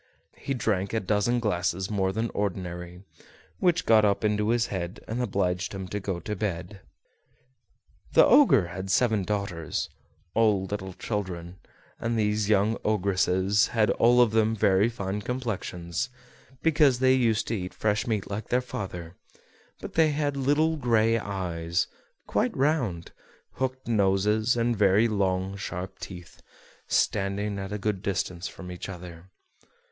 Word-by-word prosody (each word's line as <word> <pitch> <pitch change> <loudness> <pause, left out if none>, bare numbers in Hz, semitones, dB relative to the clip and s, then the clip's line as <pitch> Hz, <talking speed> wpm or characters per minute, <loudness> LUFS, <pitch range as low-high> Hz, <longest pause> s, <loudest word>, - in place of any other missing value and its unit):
He 135 - -3
drank 100 -5 -1
a 110 - +2
dozen 105 +4 +1
glasses 95 -2 -1
more 95 -2 +1
than 110 +3 -2
ordinary, 90 -2 -4 0.6
which 175 -1 +2
got 110 -1 +5
up 100 +1 +2
into 105 0 +1
his 120 0 +2
head 90 0 -4
and 115 +3 -2
obliged 95 -5 -1
him 95 -1 -5
to 105 - -3
go 95 -3 -3
to 105 +5 -4
bed. 95 -1 -4 1.3
The - - +7
Ogre 150 - +5
had 95 +2 -6
seven 110 +1 +3
daughters, 100 -5 -3 0.4
all 105 -4 +3
little 95 -1 -5
children, 90 -4 -5 0.4
and 115 0 -1
these 105 -1 +1
young 105 +1 +3
ogresses 100 -1 +2
had 110 -2 +2
all 120 +1 +5
of 120 -3 +4
them 110 0 +2
very 100 +1 +3
fine 100 -3 -4
complexions, 110 -3 -3 0.5
because 150 -5 +4
they 130 +1 +4
used 115 -4 +2
to 115 - 0
eat 90 -3 -4
fresh 110 +3 0
meat 110 -4 -1
like 100 +2 -5
their 125 - +3
father; 90 -8 -6 0.7
but - - -7
they 160 -1 +4
had 145 -1 -1
little 145 +4 +2
gray 115 -3 +2
eyes, 85 -5 -2 0.4
quite - - 0
round, 130 - 0 0.5
hooked 130 -1 -3
noses, 105 +2 +2
and 120 0 +1
very 105 +2 +4
long 95 -2 0
sharp 95 -1 -6
teeth, 90 -3 -10 0.5
standing 100 0 0
at 95 0 -5
a 105 - -2
good 105 -2 -2
distance 95 -2 -2
from 90 -1 -9
each 90 +1 -7
other. 90 -1 -10
105 Hz, 145 wpm, -27 LUFS, 95-115 Hz, 1.3 s, The